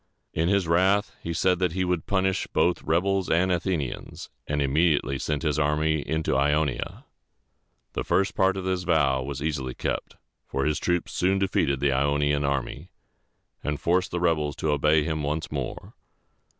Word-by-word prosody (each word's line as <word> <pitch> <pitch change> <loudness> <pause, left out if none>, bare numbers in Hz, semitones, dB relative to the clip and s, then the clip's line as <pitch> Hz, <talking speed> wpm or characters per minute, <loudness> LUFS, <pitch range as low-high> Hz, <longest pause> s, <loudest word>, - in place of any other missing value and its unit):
In 80 +2 +1
his 100 -3 +2
wrath, 95 +5 +2
he 85 - -4
said 90 +2 +2
that 90 -3 +1
he 95 0 0
would 90 -3 -1
punish 95 -1 0
both 90 - +1
rebels 95 +3 +1
and 90 +3 +2
Athenians, 85 -6 -3 0.2
and 75 0 -1
immediately 70 -1 +2
sent 75 +1 -2
his 75 -2 0
army 75 +1 +1
into 80 +1 -1
Ionia. 75 -2 0 0.9
The - - -2
first 100 +2 +1
part 95 -1 +2
of 95 - -4
his 95 -1 0
vow 70 -7 +2
was 70 +1 -5
easily 70 -5 -2
kept, - - -3 0.3
for 70 +1 -2
his 75 -1 +1
troops 90 -1 -1
soon 95 +2 +2
defeated 90 -8 +1
the 70 -1 +3
Ionian 70 +2 +1
army, 70 -2 -2 0.7
and 75 0 -2
forced 90 +2 +1
the 90 - -2
rebels 75 -4 +1
to 80 - -1
obey 75 +1 +3
him 80 0 -2
once 75 +2 -3
more. 70 -4 -5
80 Hz, 165 wpm, -26 LUFS, 70-90 Hz, 0.9 s, the